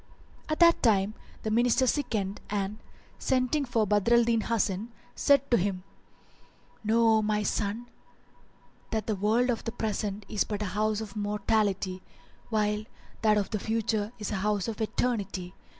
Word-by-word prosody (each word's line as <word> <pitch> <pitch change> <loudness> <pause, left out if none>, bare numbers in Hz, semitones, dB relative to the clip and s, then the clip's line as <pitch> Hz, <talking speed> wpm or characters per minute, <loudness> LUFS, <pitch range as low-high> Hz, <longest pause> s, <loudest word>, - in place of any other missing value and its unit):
At 310 - -1
that 335 0 +6
time 205 -3 +3 0.3
the 220 - -1
Minister 240 +3 +3
sickened 215 -8 -1
and, 205 +1 -2 0.4
sending 260 +3 +1
for 230 -3 +1
Badr 210 +3 +3
al 235 - +6
Din 230 -1 +2
Hasan, 220 -1 -1 0.2
said 280 -1 +3
to 240 - +6
him, 185 -1 -1 1.0
"Know, 225 +1 +4
O - - +2
my 210 0 0
son, 210 +3 -1 1.0
that 220 -1 -2
the 215 - -1
world 225 +6 +2
of 230 - -3
the 230 - -3
Present 210 -2 -3
is 210 - +1
but 210 -1 -4
a 195 - -4
house 215 +1 0
of 215 -2 -8
mortality, 205 -2 0 0.5
while 210 -1 0 0.4
that 215 -1 +4
of 200 -2 -1
the 215 - -1
Future 220 -1 -1
is 210 -1 -4
a 210 - -1
house 205 -1 0
of 225 0 -4
eternity. 200 -5 -2
215 Hz, 160 wpm, -28 LUFS, 205-230 Hz, 1.0 s, that